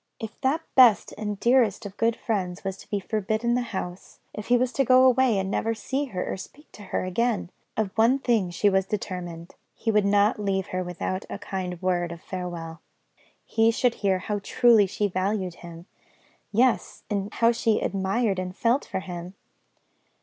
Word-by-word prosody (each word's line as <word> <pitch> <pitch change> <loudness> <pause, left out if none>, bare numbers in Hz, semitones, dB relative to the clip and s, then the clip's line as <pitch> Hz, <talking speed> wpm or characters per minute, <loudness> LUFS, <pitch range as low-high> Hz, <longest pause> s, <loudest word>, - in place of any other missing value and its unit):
If 220 -1 -8
that 285 +5 +1
best 245 -5 +6
and 210 -2 -4
dearest 235 -4 +3
of 200 -1 -7
good 230 +1 +1
friends 190 -6 -3
was 195 -1 -3
to - - -15
be 205 - -1
forbidden 220 +4 -1
the 250 - +1
house, 180 -2 -6 0.2
if 210 - -7
he 245 - +5
was 250 +1 0
to 275 - +2
go 255 0 +6
away 255 -3 +4
and 190 0 -1
never 225 +2 0
to - - -14
see 275 +2 -2
her 185 -9 -4
or - - -3
speak 295 +10 -12
to - - -13
her - - -1
again, 210 0 -1 0.3
of 215 -3 -1
one 230 +4 +4
thing 230 -8 +1
she 175 +4 +1
was 190 -1 +2
determined 175 -4 -5 0.2
he 225 - -1
should 210 -2 +3
not 205 +2 +3
leave 195 -2 -1
her 185 0 -2
without 180 +2 -4
a - - -5
kind 185 -3 -5
word 175 -2 0
of 170 - -8
farewell; 175 -3 -6 0.6
he 225 0 +3
should 240 +1 +2
hear 195 -2 +2
how 205 +3 -3
truly 225 -1 +4
she 205 +2 -1
valued 185 -1 -1
him; 170 0 -10 0.7
yes, 245 +3 +1
and 200 0 -2
how 230 0 +4
she 230 -2 +1
admired 195 +2 0
and 185 0 -5
felt 240 +6 +2
for 190 - -4
him! 180 0 -7
205 Hz, 190 wpm, -25 LUFS, 185-230 Hz, 0.7 s, best